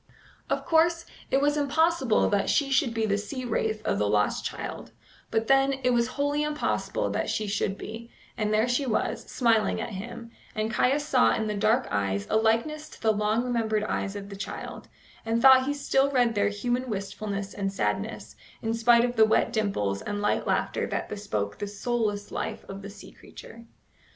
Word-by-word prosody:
Of -, -, -1 dB
course, 330 Hz, +1 st, +3 dB, 0.2 s
it 270 Hz, -, +2 dB
was 290 Hz, +1 st, +2 dB
impossible 295 Hz, -3 st, +2 dB
that 200 Hz, -1 st, +1 dB
she 280 Hz, -2 st, +2 dB
should 265 Hz, -2 st, +3 dB
be 225 Hz, -1 st, 0 dB
the 200 Hz, -1 st, +1 dB
sea 255 Hz, +5 st, -5 dB
wraith 220 Hz, -2 st, -1 dB
of -, -, 0 dB
the 105 Hz, 0 st, +1 dB
lost 105 Hz, 0 st, +1 dB
child; -, -, -6 dB, 0.4 s
but, 225 Hz, 0 st, 0 dB
then, 270 Hz, +2 st, +4 dB
it 250 Hz, -, +3 dB
was 235 Hz, -1 st, +2 dB
wholly 285 Hz, +1 st, +1 dB
impossible 300 Hz, 0 st, -1 dB
that -, -, -1 dB
she 215 Hz, -, -1 dB
should 200 Hz, -1 st, -1 dB
be, 230 Hz, +2 st, -8 dB, 0.3 s
and 210 Hz, -1 st, -1 dB
there 215 Hz, +2 st, +3 dB
she 245 Hz, +3 st, 0 dB
was, 220 Hz, -, -1 dB
smiling 230 Hz, -4 st, +2 dB
at -, -, -4 dB
him, 230 Hz, +4 st, -7 dB, 0.2 s
and 215 Hz, +1 st, -1 dB
Caius 285 Hz, +3 st, +2 dB
saw 255 Hz, -4 st, +4 dB
in 220 Hz, -, -1 dB
the 210 Hz, -, -1 dB
dark 215 Hz, +5 st, +2 dB
eyes 100 Hz, -1 st, -1 dB
a -, -, +2 dB
likeness 230 Hz, +8 st, +1 dB
to -, -, -14 dB
the 220 Hz, -1 st, +2 dB
long 210 Hz, +3 st, +1 dB
remembered 225 Hz, -4 st, 0 dB
eyes 200 Hz, -1 st, -2 dB
of 200 Hz, 0 st, -7 dB
the 200 Hz, -, -7 dB
child, 195 Hz, +1 st, -7 dB, 0.4 s
and 225 Hz, +1 st, 0 dB
thought 260 Hz, +1 st, +7 dB
he 285 Hz, -, +1 dB
still 275 Hz, -1 st, +2 dB
read 245 Hz, -4 st, +2 dB
there 205 Hz, -1 st, +2 dB
human 245 Hz, +5 st, -2 dB
wistfulness 200 Hz, 0 st, -4 dB
and 195 Hz, -1 st, -2 dB
sadness, 195 Hz, -, -3 dB, 0.3 s
in 225 Hz, 0 st, 0 dB
spite 235 Hz, +1 st, +5 dB
of 245 Hz, 0 st, -3 dB
the 220 Hz, -, +7 dB
wet 220 Hz, +1 st, +2 dB
dimples 105 Hz, -, -1 dB
and 205 Hz, 0 st, -4 dB
light 205 Hz, -, 0 dB
laughter -, -, 0 dB
that -, -, -3 dB
bespoke 105 Hz, -, -3 dB
the 205 Hz, -, -3 dB
soulless 205 Hz, 0 st, -2 dB
life -, -, -4 dB
of 195 Hz, 0 st, -7 dB
the 200 Hz, -, -8 dB
sea 200 Hz, 0 st, -12 dB
creature. 230 Hz, 0 st, -13 dB
225 Hz, 195 wpm, -27 LUFS, 205-255 Hz, 0.4 s, thought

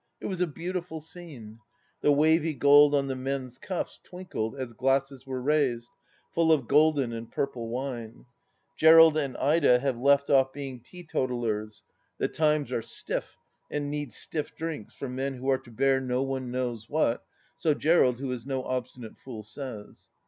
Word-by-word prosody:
It -, -, -8 dB
was 185 Hz, -2 st, -3 dB
a 180 Hz, -, +3 dB
beautiful 170 Hz, +1 st, -5 dB
scene. 150 Hz, -10 st, -11 dB, 0.4 s
The 145 Hz, -, +4 dB
wavy 155 Hz, +2 st, +3 dB
gold 145 Hz, +2 st, +6 dB
on 140 Hz, -1 st, +2 dB
the 135 Hz, -1 st, -3 dB
men's 130 Hz, -1 st, -4 dB
cuffs 185 Hz, -2 st, -4 dB
twinkled 180 Hz, -12 st, -5 dB
as 130 Hz, -3 st, -5 dB
glasses 135 Hz, +1 st, 0 dB
were 130 Hz, -1 st, -3 dB
raised, 130 Hz, -5 st, +1 dB, 0.4 s
full 165 Hz, -1 st, +3 dB
of 140 Hz, -7 st, +2 dB
golden 145 Hz, -4 st, +3 dB
and 115 Hz, 0 st, -7 dB
purple 120 Hz, -5 st, -3 dB
wine.... 120 Hz, -2 st, -5 dB, 0.5 s
Gerald 160 Hz, 0 st, +8 dB
and 140 Hz, -4 st, -1 dB
Ida 145 Hz, -3 st, +4 dB
have 130 Hz, -1 st, -2 dB
left 140 Hz, +2 st, +3 dB
off 135 Hz, -1 st, +4 dB
being 135 Hz, -3 st, -6 dB
teetotalers; 120 Hz, -8 st, -3 dB, 0.3 s
the -, -, 0 dB
times 150 Hz, -2 st, +1 dB
are -, -, -1 dB
stiff, -, -, -4 dB, 0.3 s
and 145 Hz, -1 st, -3 dB
need 145 Hz, -4 st, -4 dB
stiff 150 Hz, +7 st, -4 dB
drinks 160 Hz, -9 st, -5 dB
for 140 Hz, -, -5 dB
men 135 Hz, +2 st, -3 dB
who 130 Hz, +1 st, -7 dB
are 130 Hz, -, +2 dB
to 130 Hz, -, -17 dB
bear 135 Hz, +3 st, +2 dB
no 125 Hz, 0 st, 0 dB
one 135 Hz, -2 st, -3 dB
knows 120 Hz, -3 st, -3 dB
what, 145 Hz, -6 st, +1 dB, 0.3 s
so 155 Hz, -3 st, +1 dB
Gerald, 145 Hz, -6 st, +3 dB
who 130 Hz, 0 st, -4 dB
is 125 Hz, -2 st, -4 dB
no 135 Hz, -1 st, -3 dB
obstinate 125 Hz, -3 st, -5 dB
fool, 115 Hz, -5 st, -8 dB
says. 110 Hz, -1 st, -9 dB
135 Hz, 170 wpm, -28 LUFS, 125-150 Hz, 0.5 s, Gerald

